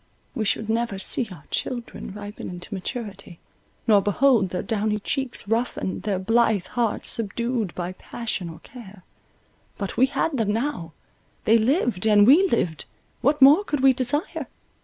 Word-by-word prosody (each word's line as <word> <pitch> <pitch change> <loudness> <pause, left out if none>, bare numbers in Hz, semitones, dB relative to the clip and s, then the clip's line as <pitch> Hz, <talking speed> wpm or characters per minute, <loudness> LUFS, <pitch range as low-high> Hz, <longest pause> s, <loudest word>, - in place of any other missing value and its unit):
We 225 -5 -2
should 210 +2 0
never 225 -2 -1
see 225 +4 -2
our 170 -7 -11
children 240 -5 -4
ripen 205 +1 -7
into 180 +3 -8
maturity, 200 -2 -6 0.5
nor 210 -3 +5
behold 210 0 +3
their 180 - -3
downy 215 -1 0
cheeks 250 +1 -3
roughen, 225 -3 -1
their 205 -3 -1
blithe 220 -1 +2
hearts 230 +2 -1
subdued 230 -1 -2
by 175 0 -3
passion 200 -3 -5
or 165 -1 -11
care; 210 -6 -13 0.7
but 200 -2 -5
we 260 - +5
had 280 +2 -1
them 210 -2 +1
now—they 225 - -2
lived, 230 - +1
and 205 -1 +6
we 320 - +6
lived—what 265 - -1
more 295 +9 +8
could 295 -8 -2
we 270 0 +6
desire? 275 +6 -2
220 Hz, 145 wpm, -24 LUFS, 195-250 Hz, 0.7 s, more